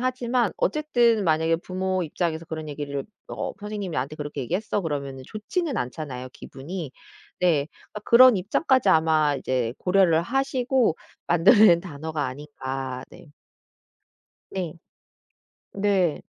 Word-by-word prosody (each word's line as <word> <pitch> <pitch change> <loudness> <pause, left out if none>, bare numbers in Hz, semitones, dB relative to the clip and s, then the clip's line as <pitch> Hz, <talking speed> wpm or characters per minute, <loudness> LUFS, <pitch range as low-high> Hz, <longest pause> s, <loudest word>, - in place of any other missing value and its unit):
하지만 250 -3 0
어쨌든 235 -5 +2
만약에 160 0 +2
부모 185 +1 -2
입장에서 165 0 -2
그런 155 -1 -6
얘기를 140 -1 -4 0.2
"어 - - -4
선생님이 205 -5 -5
나한테 140 +3 -3
그렇게 145 -1 -5
얘기했어." 195 - -2
그러면은 140 -4 -4
좋지는 280 - -3
않잖아요 130 -1 -5
기분이. 155 +3 -7 0.5
네. 160 -6 +2 0.3
그러니까 210 - -6
그런 245 -1 +7
입장까지 235 - +1
아마 155 -3 +3
이제 125 -4 -1
고려를 180 -3 +3
하시고 260 - +1 0.3
만들어 175 +7 +5
낸 170 -5 +6
단어가 155 -3 -4
아닌가. 130 -1 -5
네. 160 - -15 1.2
네. 180 -5 -3 1.0
네. 195 -5 +1
170 Hz, 305 characters per minute, -25 LUFS, 145-210 Hz, 1.2 s, 그런